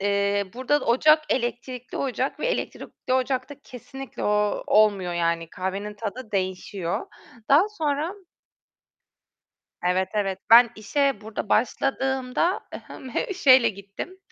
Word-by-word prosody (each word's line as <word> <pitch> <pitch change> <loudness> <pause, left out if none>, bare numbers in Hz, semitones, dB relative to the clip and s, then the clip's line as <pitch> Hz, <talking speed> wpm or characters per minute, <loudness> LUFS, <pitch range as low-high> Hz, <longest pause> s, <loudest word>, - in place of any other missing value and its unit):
Eee, 200 0 +1
burada 260 +4 +1
da - - -6
ocak 305 +6 +5
elektrikli 250 0 -3
ocak 265 0 -2
ve - - 0
elektrikli - - -4
ocakta 260 +2 0
kesinlikle 270 +2 -8
o 210 0 +1
olmuyor 205 -4 +3
yani, 170 -1 -1
kahvenin 195 +3 -4
tadı 220 +2 -6
değişiyor. 185 -2 -2 0.4
Daha 315 +9 +5
sonra 315 -3 -2 1.7
Evet, 185 +1 +1
evet, 195 -3 -1
ben 235 +1 +9
işe 275 +3 0
burada 215 -1 -6
başladığımda, 265 - 0
ı - - -2
hım, 260 - -10
he 320 +9 -2
şeyle 260 -9 +6
gittim, 200 - -8
235 Hz, 120 wpm, -25 LUFS, 200-270 Hz, 1.7 s, ben